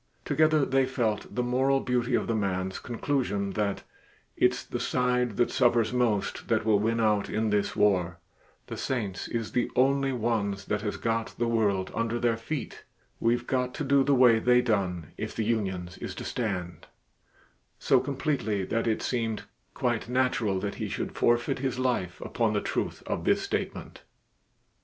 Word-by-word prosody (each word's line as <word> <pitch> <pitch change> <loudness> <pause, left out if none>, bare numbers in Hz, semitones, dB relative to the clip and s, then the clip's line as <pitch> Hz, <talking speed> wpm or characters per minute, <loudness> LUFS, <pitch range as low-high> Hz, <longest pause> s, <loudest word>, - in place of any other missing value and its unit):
Together 155 -2 +3
they 135 0 +2
felt 115 -5 -1
the 125 - +1
moral 130 +3 +2
beauty 125 -1 0
of - - 0
the 115 - -1
man's 95 -3 -1
conclusion 120 -5 -1
that 100 -1 -1 0.5
"it's - - +2
the - - -5
side 125 -3 0
that 120 - +2
suffers 120 -3 +3
most 120 -5 0
that - - +1
will 105 -2 +4
win 115 +2 0
out 105 -2 +2
in 110 0 0
this 105 -1 0
war 90 -5 +2 0.5
the - - -6
saints 105 -8 -3
is 115 -2 -3
the 125 - 0
only 135 +1 +3
ones 110 -5 -1
that 105 -1 -1
has 105 -1 -3
got 115 -1 -2
the 120 - 0
world 100 -5 +1
under 115 0 -1
their 120 -1 +1
feet 125 +5 -5 0.4
we've 120 +1 +1
got 125 -1 -1
to - - -3
do 140 0 +4
the 140 0 +3
way 125 -3 +6
they 125 +2 +4
done 95 -9 -1
if - - -4
the 110 - -1
unions 95 -6 -2
is - - -6
to - - -6
stand," 90 -8 -4 0.9
so 130 - +3
completely 130 -7 -1
that 115 +4 -1
it 110 - 0
seemed 115 -3 -1 0.3
quite - - -1
natural 125 -6 +1
that 100 +1 -3
he - - -2
should - - -3
forfeit 120 +1 +2
his 130 -2 -2
life 125 -9 -1
upon 115 -3 0
the 105 - +2
truth - - -3
of - - -3
this - - +2
statement. - - -4
115 Hz, 170 wpm, -28 LUFS, 105-125 Hz, 0.9 s, way